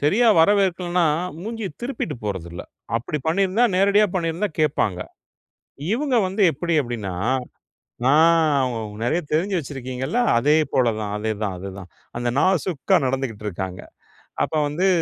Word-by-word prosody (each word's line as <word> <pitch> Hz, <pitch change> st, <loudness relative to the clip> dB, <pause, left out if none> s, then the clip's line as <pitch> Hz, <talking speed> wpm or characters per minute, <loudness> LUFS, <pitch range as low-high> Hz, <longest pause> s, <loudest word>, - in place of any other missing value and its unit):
சரியா 210 Hz, +11 st, +3 dB
வரவேற்கலன்னா 180 Hz, -2 st, +2 dB, 0.3 s
மூஞ்சிய 220 Hz, +1 st, -4 dB
திருப்பிட்டு 240 Hz, -, -3 dB
போறதில்ல. 85 Hz, -4 st, -5 dB, 0.3 s
அப்படி 130 Hz, +6 st, -3 dB
பண்ணிருந்தா 195 Hz, +7 st, +2 dB
நேரடியா 200 Hz, +2 st, +4 dB
பண்ணிருந்தா 170 Hz, +3 st, -1 dB
கேப்பாங்க. 140 Hz, -, +1 dB, 0.9 s
இவங்க 265 Hz, 0 st, 0 dB
வந்து 195 Hz, +3 st, -1 dB
எப்படி 170 Hz, +4 st, -2 dB
அப்படின்னா 110 Hz, -7 st, -5 dB, 0.9 s
நான் 150 Hz, -3 st, +4 dB, 0.3 s
நெறைய 140 Hz, +8 st, +1 dB
தெரிஞ்சு 185 Hz, +6 st, +1 dB
வச்சிருக்கீங்களா 135 Hz, -, -3 dB, 0.2 s
அதேபோல 140 Hz, -1 st, +2 dB
தான். 105 Hz, -1 st, -4 dB
அதேதான் 105 Hz, -2 st, -2 dB
அதுதான். 95 Hz, 0 st, -8 dB, 0.3 s
அந்த 120 Hz, 0 st, -1 dB
நாசூக்கா 180 Hz, -4 st, +1 dB
நடந்துகிட்டு 130 Hz, -5 st, -2 dB
இருக்காங்க. 95 Hz, -1 st, -5 dB, 0.6 s
அப்ப -, -, -4 dB
வந்து 170 Hz, +6 st, 0 dB
155 Hz, 110 wpm, -22 LUFS, 120-190 Hz, 0.9 s, நேரடியா